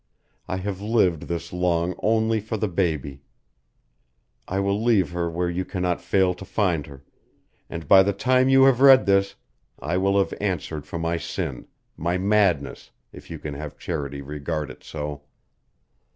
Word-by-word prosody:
I 95 Hz, -, -2 dB
have 95 Hz, 0 st, -4 dB
lived 100 Hz, -7 st, +1 dB
this 85 Hz, 0 st, -5 dB
long 90 Hz, -1 st, 0 dB
only 110 Hz, +1 st, +2 dB
for 110 Hz, +1 st, -4 dB
the 105 Hz, -, -1 dB
baby. 80 Hz, -7 st, -2 dB, 1.3 s
I 95 Hz, -, -1 dB
will 100 Hz, +1 st, 0 dB
leave 110 Hz, -7 st, +3 dB
her 85 Hz, -1 st, -2 dB
where 85 Hz, +2 st, -2 dB
you 85 Hz, +2 st, -2 dB
cannot 90 Hz, -2 st, -2 dB
fail 95 Hz, -2 st, +2 dB
to 90 Hz, -, -11 dB
find 90 Hz, -7 st, -1 dB
her, 70 Hz, -1 st, -13 dB, 0.7 s
and 85 Hz, -3 st, -7 dB
by 95 Hz, +4 st, +8 dB
the 100 Hz, +1 st, +2 dB
time 130 Hz, +6 st, +2 dB
you 135 Hz, 0 st, +6 dB
have 135 Hz, -2 st, +4 dB
read 135 Hz, -1 st, +8 dB
this 100 Hz, 0 st, +2 dB, 0.4 s
I 85 Hz, +3 st, -2 dB
will 100 Hz, +1 st, +2 dB
have 100 Hz, -, +1 dB
answered 80 Hz, -6 st, -3 dB
for 85 Hz, -, -5 dB
my 85 Hz, 0 st, -1 dB
sin -, -, -5 dB, 0.3 s
my 85 Hz, +3 st, -1 dB
madness, 95 Hz, -6 st, +1 dB, 0.2 s
if -, -, -13 dB
you -, -, -6 dB
can 75 Hz, -, -6 dB
have 75 Hz, +1 st, -7 dB
charity 70 Hz, -4 st, -4 dB
regard 75 Hz, +1 st, -4 dB
it -, -, -15 dB
so. 75 Hz, -2 st, -6 dB
90 Hz, 165 wpm, -24 LUFS, 80-100 Hz, 1.3 s, by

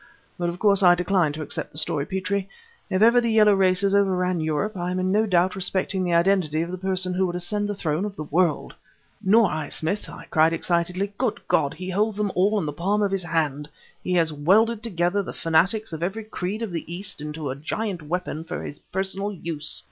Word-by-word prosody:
But 175 Hz, -1 st, -2 dB
of 170 Hz, -, -5 dB
course 200 Hz, 0 st, +3 dB
I 175 Hz, -2 st, +7 dB
decline 180 Hz, -3 st, +1 dB
to 155 Hz, +1 st, -5 dB
accept 145 Hz, -, -5 dB
the -, -, -13 dB
story, 150 Hz, -2 st, -1 dB
Petrie! 190 Hz, +1 st, -2 dB, 0.4 s
if 185 Hz, +3 st, +2 dB
ever 235 Hz, +2 st, +6 dB
the 235 Hz, -, 0 dB
Yellow 215 Hz, -2 st, +5 dB
races 195 Hz, 0 st, +2 dB
overran 185 Hz, -3 st, +2 dB
Europe, 160 Hz, +7 st, -1 dB
I 175 Hz, -1 st, -3 dB
am 180 Hz, -, -2 dB
in 185 Hz, 0 st, 0 dB
no 215 Hz, +2 st, +2 dB
doubt 180 Hz, 0 st, +2 dB
respecting 190 Hz, 0 st, 0 dB
the 175 Hz, -2 st, +1 dB
identity 170 Hz, -3 st, +2 dB
of 170 Hz, -, -6 dB
the 185 Hz, -, -4 dB
person 185 Hz, -1 st, 0 dB
who 185 Hz, +1 st, +1 dB
would 175 Hz, -, -4 dB
ascend 205 Hz, +4 st, -1 dB
the 205 Hz, -, -2 dB
throne 160 Hz, -1 st, -1 dB
of 205 Hz, -1 st, -4 dB
the 155 Hz, -, -5 dB
world!" 160 Hz, +1 st, 0 dB, 0.5 s
"Nor 210 Hz, 0 st, +4 dB
I, 155 Hz, -1 st, -3 dB
Smith!" 185 Hz, +7 st, -3 dB
I -, -, -10 dB
cried 160 Hz, +1 st, +4 dB
excitedly. 180 Hz, +4 st, -1 dB
"Good 250 Hz, -4 st, 0 dB
God! 140 Hz, -, +1 dB
he 185 Hz, +2 st, -6 dB
holds 210 Hz, +2 st, 0 dB
them 210 Hz, -2 st, 0 dB
all 200 Hz, +4 st, +2 dB
in 190 Hz, -, -1 dB
the 150 Hz, -, -3 dB
palm 200 Hz, +7 st, 0 dB
of 200 Hz, -, 0 dB
his 195 Hz, -1 st, 0 dB
hand! 150 Hz, -3 st, -1 dB, 0.3 s
He 180 Hz, -, -2 dB
has 165 Hz, -3 st, +3 dB
welded 210 Hz, +10 st, +3 dB
together 190 Hz, -3 st, 0 dB
the -, -, -7 dB
fanatics 180 Hz, +6 st, +2 dB
of 160 Hz, -, -5 dB
every 195 Hz, +6 st, -2 dB
creed 215 Hz, 0 st, -4 dB
of 220 Hz, -, -4 dB
the 165 Hz, -1 st, -5 dB
East 180 Hz, -2 st, -3 dB
into 150 Hz, -2 st, -4 dB
a -, -, -4 dB
giant 180 Hz, +5 st, -4 dB
weapon 160 Hz, 0 st, -4 dB
for 175 Hz, +2 st, -6 dB
his 145 Hz, -, -7 dB
personal 195 Hz, +2 st, -3 dB
use! 165 Hz, -5 st, -3 dB
185 Hz, 225 wpm, -24 LUFS, 165-200 Hz, 0.5 s, I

